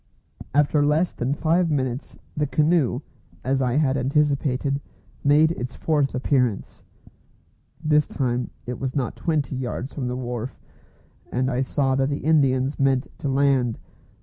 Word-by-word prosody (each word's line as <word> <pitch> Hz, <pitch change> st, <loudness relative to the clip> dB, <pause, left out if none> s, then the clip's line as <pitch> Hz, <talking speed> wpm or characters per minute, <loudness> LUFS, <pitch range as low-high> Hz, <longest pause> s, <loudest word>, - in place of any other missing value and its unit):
After 145 Hz, 0 st, +3 dB
less 155 Hz, +4 st, +2 dB
than 130 Hz, +4 st, -2 dB
five 165 Hz, +3 st, +2 dB
minutes 130 Hz, -3 st, -2 dB, 0.2 s
the 150 Hz, -1 st, 0 dB
canoe, 150 Hz, -2 st, +2 dB, 0.4 s
as 135 Hz, +1 st, +1 dB
I 125 Hz, -2 st, +1 dB
had 140 Hz, -1 st, +2 dB
anticipated, 140 Hz, 0 st, +1 dB, 0.4 s
made 150 Hz, +3 st, +5 dB
its 125 Hz, -5 st, -5 dB
fourth 145 Hz, -4 st, 0 dB
appearance. 125 Hz, -5 st, 0 dB, 1.0 s
This 150 Hz, -1 st, +3 dB
time 125 Hz, -2 st, -1 dB, 0.2 s
it 125 Hz, 0 st, -5 dB
was 130 Hz, -1 st, -3 dB
not 130 Hz, -5 st, -1 dB
twenty 150 Hz, -6 st, -1 dB
yards 130 Hz, +1 st, -4 dB
from 130 Hz, -4 st, -3 dB
the 125 Hz, 0 st, -2 dB
wharf, 125 Hz, -1 st, -5 dB, 0.7 s
and 130 Hz, +2 st, 0 dB
I 125 Hz, +1 st, 0 dB
saw 135 Hz, 0 st, +1 dB
that 135 Hz, +1 st, +1 dB
the 145 Hz, -1 st, -3 dB
Indians 135 Hz, -3 st, +2 dB
meant 135 Hz, -1 st, +2 dB
to 140 Hz, -, -2 dB
land. 135 Hz, -4 st, +2 dB
135 Hz, 145 wpm, -24 LUFS, 125-150 Hz, 1.0 s, made